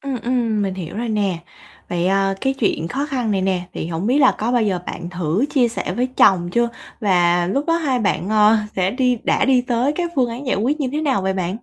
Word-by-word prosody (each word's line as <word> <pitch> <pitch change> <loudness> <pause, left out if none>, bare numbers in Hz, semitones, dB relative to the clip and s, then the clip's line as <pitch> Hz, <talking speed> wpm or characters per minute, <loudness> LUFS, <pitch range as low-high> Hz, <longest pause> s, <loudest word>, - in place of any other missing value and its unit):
Ừm, 270 -3 -4
ừm, 230 -3 0
mình 195 -1 -2
hiểu 180 0 -7
rồi 235 +1 -3
nè. 200 -5 0 0.5
Vậy, 175 0 -1
à, 195 0 +2
cái 270 0 0
chuyện 200 -9 -1
khó 275 +7 -2
khăn 250 -7 -2
này 195 -2 0
nè, 185 -2 -1
thì - - -4
hổng 170 +3 -3
biết 255 +5 +2
là 265 -3 +5
có 230 +3 -1
bao 245 -2 +3
giờ 195 -4 0
bạn 170 - -6
thử 175 - -1
chia 250 -5 +3
sẻ 230 - -4
với 250 - +1
chồng 180 -3 +4
chưa 235 +2 +2 0.3
và 175 -4 +2
lúc 275 +10 -1
đó 330 0 +2
hai 280 -7 0
bạn, 205 -3 -1
ờ, 215 +1 +5 0.2
sẽ 185 0 +1
đi 250 0 +1
đã - - +2
đi 260 -2 +4
tới 250 +3 0
các 345 +1 -3
phương 250 -3 +2
án 250 +5 -7
giải 255 - +1
quyết 270 +9 0
như 265 - 0
thế 300 - -1
nào 270 -10 0
vậy 190 0 0
bạn? 190 +4 -3
220 Hz, 255 wpm, -20 LUFS, 190-255 Hz, 0.5 s, là